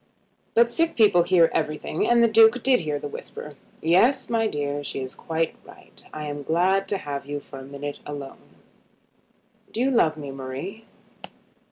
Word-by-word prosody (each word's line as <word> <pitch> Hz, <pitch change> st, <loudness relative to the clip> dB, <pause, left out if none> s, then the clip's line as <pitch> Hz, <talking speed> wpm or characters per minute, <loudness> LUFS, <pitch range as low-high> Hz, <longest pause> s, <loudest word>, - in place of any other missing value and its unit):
But 235 Hz, +1 st, +5 dB
sick 330 Hz, +4 st, 0 dB
people 205 Hz, -6 st, +5 dB
hear 170 Hz, -1 st, +4 dB
everything, 155 Hz, 0 st, -1 dB
and 240 Hz, 0 st, +5 dB
the -, -, +6 dB
Duke 225 Hz, +2 st, +5 dB
did 260 Hz, -2 st, +4 dB
hear 150 Hz, -4 st, -2 dB
the 145 Hz, -, -5 dB
whisper. 145 Hz, +1 st, -8 dB, 0.3 s
"Yes, 235 Hz, -, +3 dB
my 225 Hz, -1 st, +2 dB
dear; 145 Hz, -4 st, -3 dB
she 140 Hz, -, -5 dB
is 130 Hz, -1 st, -5 dB
quite 165 Hz, 0 st, -2 dB
right. -, -, -14 dB
I 155 Hz, 0 st, -6 dB
am 145 Hz, 0 st, -5 dB
glad 185 Hz, +6 st, +1 dB
to 200 Hz, -, -1 dB
have 140 Hz, -4 st, -6 dB
you 145 Hz, 0 st, -3 dB
for 140 Hz, -1 st, -11 dB
a -, -, -9 dB
minute 140 Hz, +1 st, -7 dB
alone. 145 Hz, -2 st, -9 dB, 1.2 s
Do -, -, -5 dB
you 265 Hz, +2 st, +2 dB
love 165 Hz, -11 st, +3 dB
me, 145 Hz, -2 st, -6 dB
Marie?" 135 Hz, +12 st, -7 dB
160 Hz, 175 wpm, -24 LUFS, 145-225 Hz, 1.2 s, the